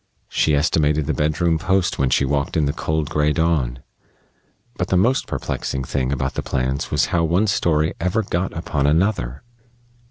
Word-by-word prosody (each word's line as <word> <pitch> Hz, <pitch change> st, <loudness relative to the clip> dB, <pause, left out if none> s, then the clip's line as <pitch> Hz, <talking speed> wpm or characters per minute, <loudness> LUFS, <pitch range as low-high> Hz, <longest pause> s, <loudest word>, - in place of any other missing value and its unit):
She 75 Hz, -, +2 dB
estimated 75 Hz, 0 st, +2 dB
the 80 Hz, -, -1 dB
bedroom 80 Hz, +3 st, +1 dB
post 95 Hz, +2 st, 0 dB
when 65 Hz, -1 st, +2 dB
she 70 Hz, -, +2 dB
walked 70 Hz, +3 st, -1 dB
in 75 Hz, -, +2 dB
the 70 Hz, -, -1 dB
cold, 80 Hz, -1 st, -2 dB
gray 75 Hz, -1 st, +2 dB
dawn.... 70 Hz, -8 st, 0 dB, 0.9 s
But 90 Hz, -, -2 dB
the 95 Hz, -, +2 dB
most 120 Hz, +8 st, +2 dB
perplexing 65 Hz, -1 st, -3 dB
thing 65 Hz, 0 st, -2 dB
about 65 Hz, -1 st, -1 dB
the -, -, -2 dB
plans 65 Hz, +1 st, -2 dB
was -, -, +2 dB
how 85 Hz, -, +3 dB
one 85 Hz, +6 st, +2 dB
story 80 Hz, -6 st, +1 dB
ever 90 Hz, +6 st, +1 dB
got 90 Hz, -1 st, -2 dB
upon 75 Hz, -3 st, -1 dB
another. 75 Hz, -, 0 dB
75 Hz, 170 wpm, -21 LUFS, 70-85 Hz, 0.9 s, how